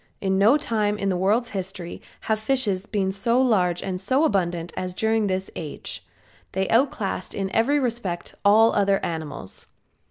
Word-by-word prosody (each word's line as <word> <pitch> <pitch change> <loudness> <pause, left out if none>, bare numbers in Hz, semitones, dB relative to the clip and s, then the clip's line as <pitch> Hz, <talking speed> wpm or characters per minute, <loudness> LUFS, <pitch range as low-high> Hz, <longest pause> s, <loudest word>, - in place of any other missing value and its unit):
In 190 -1 0
no 220 +9 +6
time 215 -6 0
in 195 -1 -1
the 185 - +1
world's 215 +6 +1
history 190 -3 -5 0.2
have 220 -1 0
fishes 220 -5 0
been 195 -3 0
so 230 +6 +1
large 185 -9 +2
and 185 -1 -3
so 260 +8 +2
abundant 175 - 0
as 180 -1 -4
during 220 0 +1
this 190 0 -2
age. 155 -3 -6 0.5
They 190 0 0
outclassed 230 -6 0
in 195 -1 -2
every 275 +6 +3
respect 230 -9 -3
all 220 +3 +6
other 200 -1 +3
animals. 150 - -6
200 Hz, 160 wpm, -24 LUFS, 185-225 Hz, 0.5 s, no